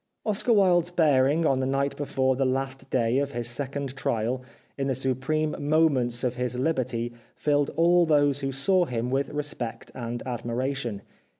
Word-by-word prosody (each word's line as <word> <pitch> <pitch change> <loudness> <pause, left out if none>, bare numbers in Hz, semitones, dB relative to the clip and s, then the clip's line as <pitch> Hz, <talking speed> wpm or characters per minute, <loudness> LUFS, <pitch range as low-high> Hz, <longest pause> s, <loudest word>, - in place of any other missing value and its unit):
Oscar 215 +2 0
Wilde's 180 -5 +4
bearing 150 -2 +3
on 135 -3 +2
the 130 - 0
night 140 +1 0
before 130 -2 0
the 135 - 0
last 135 0 -2
day 120 +1 +2
of 140 0 -2
his 120 -1 -2
second 135 +2 -3
trial, 120 -1 -1 0.3
in 135 -1 -2
the 135 - 0
supreme 135 +4 -1
moments 135 -6 +2
of 125 0 -1
his 125 0 -2
hberty, 125 -4 -1 0.3
fiUed 145 -1 +2
all 170 +2 +4
those 145 -2 +3
who 135 -1 -2
saw 175 +7 +2
him 125 -3 -3
with 135 +1 0
respect 145 -6 -4
and 120 -1 -5
admiration. 125 -2 -3
135 Hz, 165 wpm, -26 LUFS, 125-150 Hz, 0.3 s, Wilde's